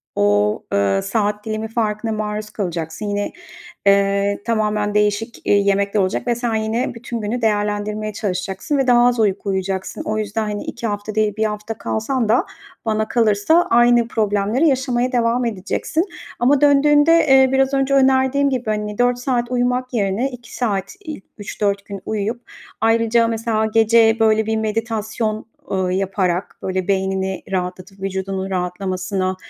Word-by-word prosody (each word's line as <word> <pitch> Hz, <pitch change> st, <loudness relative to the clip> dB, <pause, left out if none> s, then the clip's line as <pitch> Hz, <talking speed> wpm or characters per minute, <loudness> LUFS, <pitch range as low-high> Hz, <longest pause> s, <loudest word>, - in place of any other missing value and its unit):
o, 105 Hz, +1 st, +2 dB
ııı, 100 Hz, -1 st, +2 dB
saat 210 Hz, -2 st, -1 dB
dilimi 220 Hz, 0 st, -3 dB
farkına 220 Hz, 0 st, -2 dB
maruz 210 Hz, 0 st, -3 dB
kalacaksın. 175 Hz, -2 st, -4 dB
Yine, 205 Hz, 0 st, -2 dB, 0.6 s
eee, 200 Hz, 0 st, +3 dB
tamamen 210 Hz, -2 st, 0 dB
değişik, 210 Hz, +2 st, 0 dB
iii, 200 Hz, 0 st, +3 dB
yemekler 200 Hz, +1 st, +1 dB
olacak 185 Hz, +4 st, -1 dB
ve 240 Hz, -, +2 dB
sen 235 Hz, -1 st, -2 dB
yine 220 Hz, +3 st, -1 dB
bütün 235 Hz, 0 st, -5 dB
günü 225 Hz, +3 st, -3 dB
değerlendirmeye 210 Hz, 0 st, -1 dB
çalışacaksın 195 Hz, +6 st, -2 dB
ve 270 Hz, -, +1 dB
daha 240 Hz, -1 st, +5 dB
az 245 Hz, -1 st, +2 dB
uyku 200 Hz, -1 st, 0 dB
uyuyacaksın. 190 Hz, 0 st, -2 dB
O 215 Hz, 0 st, -2 dB
yüzden, 215 Hz, +1 st, -2 dB
hani, 205 Hz, 0 st, -4 dB
2 235 Hz, -1 st, -5 dB
hafta 205 Hz, 0 st, -4 dB
değil, 215 Hz, -1 st, +1 dB
1 220 Hz, -, +1 dB
hafta 210 Hz, +1 st, -3 dB
kalsan 230 Hz, +1 st, -1 dB
da 230 Hz, +4 st, +3 dB, 0.4 s
bana 215 Hz, -1 st, 0 dB
kalırsa 230 Hz, +9 st, +3 dB
aynı 240 Hz, 0 st, +4 dB
problemleri 215 Hz, +6 st, +1 dB
yaşamaya 255 Hz, -2 st, 0 dB
devam 240 Hz, 0 st, +1 dB
edeceksin 230 Hz, -, -1 dB, 0.3 s
ama 265 Hz, +3 st, +3 dB
döndüğünde, 290 Hz, +2 st, +5 dB, 0.2 s
eee, 265 Hz, -1 st, +6 dB
biraz 270 Hz, +1 st, +2 dB
önce 270 Hz, 0 st, +1 dB
önerdiğim 265 Hz, +1 st, +3 dB
gibi, 255 Hz, -2 st, -2 dB
hani, 210 Hz, -1 st, -2 dB
4 245 Hz, 0 st, +2 dB
saat 245 Hz, -1 st, -1 dB
uyumak 250 Hz, +1 st, 0 dB
yerine 215 Hz, +5 st, 0 dB
2 245 Hz, -2 st, -11 dB
saat 200 Hz, -, -2 dB
ilk 305 Hz, -11 st, -7 dB
3-4 200 Hz, -1 st, -2 dB
gün 200 Hz, -1 st, -7 dB
uyuyup 220 Hz, +3 st, -3 dB, 0.3 s
ayrıca, 230 Hz, +1 st, +3 dB
mesela, 225 Hz, -1 st, 0 dB
gece, 225 Hz, +1 st, +4 dB
böyle, 220 Hz, -1 st, +3 dB
bir 220 Hz, 0 st, 0 dB
meditasyon, 220 Hz, 0 st, -2 dB, 0.2 s
ııı, 185 Hz, -1 st, 0 dB
yaparak 190 Hz, -1 st, -1 dB
böyle 185 Hz, 0 st, -2 dB
beynini 190 Hz, -1 st, -1 dB
rahatlatıp 185 Hz, +1 st, -4 dB
vücudunun 190 Hz, 0 st, -3 dB
rahatlamasına, 185 Hz, +1 st, -2 dB
215 Hz, 150 wpm, -20 LUFS, 200-240 Hz, 0.6 s, eee